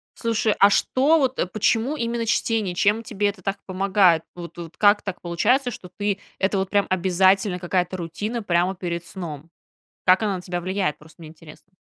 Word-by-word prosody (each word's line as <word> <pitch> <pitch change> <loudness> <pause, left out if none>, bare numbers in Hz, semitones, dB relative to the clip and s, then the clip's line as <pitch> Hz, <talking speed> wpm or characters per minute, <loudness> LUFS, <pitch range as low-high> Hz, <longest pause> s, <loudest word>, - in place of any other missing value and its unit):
Слушай, 225 -2 0
а 200 - +7
что 280 +9 +3
вот, 265 -3 0
э, - - +1
почему 225 +8 0
именно 235 -2 -2
чтение? 220 -4 0
Чем 205 +5 +2
тебе 210 -2 -1
это 200 -2 -6
так 195 +2 -2
помогает? 190 -3 +3
Вот 175 -1 -9
вот 170 -1 -9
как 205 0 +4
так 195 -3 -6
получается, 240 +10 +1
что 195 -5 -10
ты 205 -2 -1 0.2
это 195 +1 0
вот 190 0 -2
прям 200 -1 +2
обязательно, 185 +1 +2
какая-то 180 +1 -1
рутина 205 +7 -4
прямо 180 0 +1
перед 170 -2 -4
сном? 165 -4 -7 0.6
Как 185 +3 +5
она 205 -3 0
на 180 - -8
тебя 175 -1 -4
влияет? 185 -3 -2
Просто 155 +1 -18
мне 160 - -10
интересно. 160 +3 -16
190 Hz, 185 wpm, -23 LUFS, 175-215 Hz, 0.6 s, а